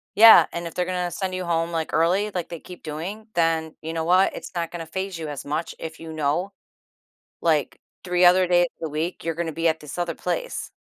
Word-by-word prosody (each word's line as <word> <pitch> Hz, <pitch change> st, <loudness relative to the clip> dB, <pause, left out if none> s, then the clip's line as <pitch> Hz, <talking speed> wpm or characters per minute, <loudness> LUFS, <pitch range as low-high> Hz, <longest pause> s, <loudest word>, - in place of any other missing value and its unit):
Yeah, 225 Hz, +2 st, +9 dB
and 170 Hz, 0 st, -4 dB
if 165 Hz, -, -8 dB
they're 180 Hz, -, 0 dB
gonna 180 Hz, -1 st, -2 dB
send 185 Hz, -1 st, -3 dB
you 185 Hz, -1 st, -3 dB
home, 165 Hz, 0 st, 0 dB
like, 160 Hz, -1 st, -3 dB
early, 185 Hz, +6 st, +2 dB
like 180 Hz, -3 st, -4 dB
they 170 Hz, -2 st, -6 dB
keep 180 Hz, -1 st, -12 dB
doing, 180 Hz, +9 st, -6 dB
then, 165 Hz, -1 st, +1 dB
you 160 Hz, +1 st, -5 dB
know 165 Hz, -1 st, -1 dB
what? 185 Hz, +3 st, +4 dB
It's -, -, -8 dB
not 170 Hz, -1 st, -2 dB
gonna 170 Hz, -2 st, -6 dB
phase 190 Hz, +1 st, -4 dB
you 160 Hz, -2 st, -5 dB
as 145 Hz, -2 st, -6 dB
much 155 Hz, +3 st, -3 dB
if 160 Hz, -1 st, -7 dB
you 165 Hz, -1 st, -8 dB
know, 155 Hz, +5 st, -1 dB, 0.9 s
like, 155 Hz, -4 st, +1 dB, 0.2 s
3 180 Hz, 0 st, +1 dB
other 180 Hz, +1 st, +6 dB
days 175 Hz, 0 st, +4 dB
a 160 Hz, -, -3 dB
week, 160 Hz, +4 st, -3 dB
you're 165 Hz, -, -1 dB
gonna 165 Hz, -1 st, -2 dB
be 165 Hz, +2 st, 0 dB
at 160 Hz, 0 st, +1 dB
this 150 Hz, +1 st, -9 dB
other 175 Hz, -2 st, -2 dB
place. -, -, -3 dB
170 Hz, 225 wpm, -24 LUFS, 160-180 Hz, 0.9 s, Yeah